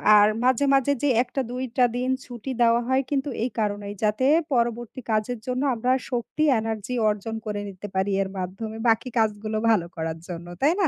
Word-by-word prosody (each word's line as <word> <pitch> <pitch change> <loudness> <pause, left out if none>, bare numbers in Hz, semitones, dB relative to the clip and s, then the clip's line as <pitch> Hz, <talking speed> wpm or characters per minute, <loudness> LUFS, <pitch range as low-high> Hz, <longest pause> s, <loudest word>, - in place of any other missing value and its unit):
আর 205 0 +7 0.2
মাঝে, 260 +2 +3
মাঝে 275 +1 +3
যে 290 - +3
১ 250 - -3
টা 270 - +2
২ 255 +1 -3
টা 250 - +6
দিন 255 +1 -1 0.2
ছুটি 245 +1 -6
দেওয়া 235 0 +5
হয় 260 +1 +3
কিন্তু 280 0 0
এই 255 - 0
কারণেই 205 -1 -2
যাতে 215 +5 +2 0.3
পরবর্তী 240 0 -1
কাজের 215 +2 0
জন্য 255 +1 -1
আমরা 245 +2 0 0.2
শক্তি 245 +5 -1 0.2
energy 220 +1 -3 0.2
অর্জন 210 +2 -3
করে 210 -1 -3
নিতে 195 +1 -8
পারি 190 +1 +1
এর 195 - -2
মাধ্যমে 195 +5 -5
বাকি 225 +3 +2
কাজগুলো 215 0 0
ভালো 210 -7 +3
করার 160 0 -3
জন্য। 175 -1 -7
তাই 300 +5 +4
না? 365 - +4
225 Hz, 195 wpm, -25 LUFS, 205-255 Hz, 0.3 s, আর